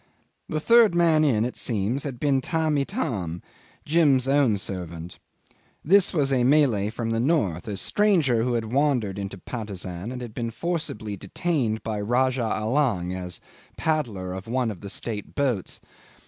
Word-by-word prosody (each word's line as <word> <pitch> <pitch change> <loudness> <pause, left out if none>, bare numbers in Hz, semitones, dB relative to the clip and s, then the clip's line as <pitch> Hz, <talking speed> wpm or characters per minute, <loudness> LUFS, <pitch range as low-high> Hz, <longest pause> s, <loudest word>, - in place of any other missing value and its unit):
The 155 - -1
third 230 +1 +5
man 165 -3 +4
in, 115 -7 +2
it 125 - -4
seems, 115 +5 -2
had 130 -4 -5
been 140 -2 +2
Tamb' 160 0 0
Itam, 115 - -3 0.4
Jim's 145 -5 +3
own 135 -6 +3
servant. 90 -3 -6 0.7
This 195 +4 +5
was 140 -6 +1
a 125 -2 +2
Malay 125 -7 +3
from 115 0 -3
the 115 - 0
north, 115 - 0
a 100 -2 -3
stranger 165 - +2
who 125 +1 0
had 115 -1 -2
wandered 130 -9 +1
into 100 0 -5
Patusan, 100 -2 -5
and 125 - -5
had 120 -3 -7
been 115 0 -3
forcibly 115 - -3
detained 130 - -1
by 110 -2 -3
Rajah 125 +4 +1
Allang 110 -6 0
as 90 -2 -5 0.4
paddler 115 - -1
of 95 +2 -7
one 120 -1 0
of 95 - -10
the 100 - -7
state 105 0 -5
boats. 125 -9 -1
120 Hz, 160 wpm, -25 LUFS, 105-145 Hz, 0.7 s, third